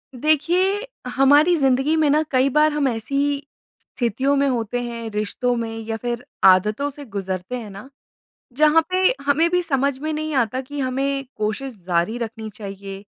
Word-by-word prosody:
देखिए, 350 - +1 0.2
हमारी 290 +7 +4
ज़िंदगी 270 +3 +2
में 305 -2 +3
ना 300 +2 +4
कई 260 0 +3
बार 305 +1 +5
हम 295 -2 +1
ऐसी 235 +3 -3
ही 285 0 0 0.4
स्थितियों 260 +4 -1
में 280 0 +2
होते 245 -2 -1
हैं, 235 -1 -5
रिश्तो 215 +4 -1
में 225 -1 -4
या 225 0 -2
फिर 240 +1 -4 0.2
आदतों 210 +9 +4
से 285 0 -10
गुज़रते 195 0 -4
हैं 225 -4 -8
ना, 200 +6 -11 0.7
जहाँ 305 +2 +5
पे 370 0 +2 0.2
हमें 295 +4 +3
भी 360 0 +2
समझ 280 -4 0
में 310 +3 -3
नहीं 310 0 -3
आता 255 -1 +1
कि 285 +2 -8
हमें 275 +1 -1
कोशिश 215 +6 -3
जारी 175 +5 0
रखनी 225 -1 -5
चाहिए, 195 -1 -8
260 Hz, 170 wpm, -22 LUFS, 225-290 Hz, 0.7 s, बार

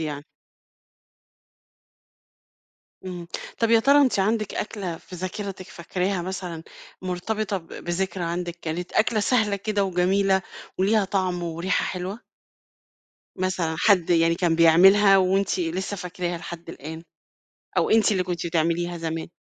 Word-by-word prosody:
يعني. 150 -2 -4 2.8
إمم، 180 -2 -6 0.3
طب 230 -1 +1
يا 230 -1 +6
ترى 280 +4 +5
أنتِ 260 -7 +3
عندِك 215 +2 0
أكلة 195 -6 -4
في 180 +2 -11
ذاكرتِك 185 +1 -5
فاكراها، 180 +2 -2
مثلًا 180 -3 -5 0.4
مرتبطة 200 +3 -2
ب 165 -3 -9
بذكرى 175 +1 -3
عندِك، 175 0 -3
كانت 170 +3 -4
أكلة 220 0 +2
سهلة 210 -2 +2
كده، 205 0 -1
وجميلة، 190 +1 +2 0.4
وليها 205 +2 +3
طعم، 185 -2 -1
وريحة 170 +3 -1
حلوة؟ 185 +4 -4 1.2
مثلًا 185 -3 -1
حد 185 -5 +3
يعني 165 0 +4
كان 170 -2 +1
بيعملها، 195 +5 +7
وأنتِ 190 0 +1
لسه 185 +4 -2
فاكراها 180 -1 -4
لحد 170 0 -9
الآن؟ 160 +1 -8 0.7
أو - - +2
أنتِ 220 -1 +4
اللي 185 -2 +1
كنتِ 175 -1 -3
بتعمليها 170 +1 0
زمان؟ 165 0 -4
185 Hz, 125 wpm, -24 LUFS, 170-200 Hz, 2.8 s, بيعملها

